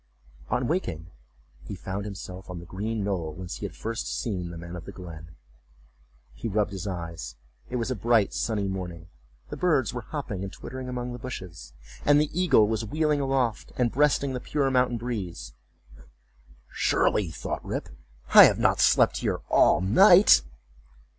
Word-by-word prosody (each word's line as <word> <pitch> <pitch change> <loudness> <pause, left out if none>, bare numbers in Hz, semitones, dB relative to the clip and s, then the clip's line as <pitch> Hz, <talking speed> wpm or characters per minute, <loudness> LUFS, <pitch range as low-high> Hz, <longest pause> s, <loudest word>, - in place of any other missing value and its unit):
On 125 0 0
waking, 90 - -3 0.5
he - - -7
found 95 +2 -5
himself 95 -2 -8
on 90 - -6
the 85 - -11
green 105 +4 -3
knoll 85 -6 -3
whence 90 0 -6
he - - -4
had - - -14
first 115 +1 -4
seen 95 -6 -3
the 85 - -8
old 85 - -8
man 85 +1 -8
of 85 -1 -8
the - - -8
glen. 80 -3 -11 1.0
He - - -6
rubbed 105 -1 0
his 95 0 -5
eyes—it 80 - -8
was 120 +1 -1
a - - -1
bright 115 -1 +2
sunny 105 -4 -1
morning. 90 -3 -6 0.4
The - - -6
birds 155 -10 +1
were 120 - -4
hopping 110 -6 -5
and 95 - -5
twittering 130 +4 -8
among 125 -1 -4
the 120 - -7
bushes, 95 - -8 0.3
and 145 0 +5
the 150 0 0
eagle 170 -11 +4
was 110 +1 -1
wheeling 150 +5 0
aloft, 135 -4 -1
and 120 -2 +1
breasting 140 -1 +2
the 125 - -3
pure 140 +1 -1
mountain 125 -2 +2
breeze. 110 -7 -5 1.2
"Surely," 100 -5 +1
thought - - -5
Rip, - - -4 0.4
"I - - +12
have - - +3
not - - +2
slept - - +4
here - - -2
all 85 - +4
night." 180 - +7
105 Hz, 170 wpm, -26 LUFS, 90-125 Hz, 1.2 s, I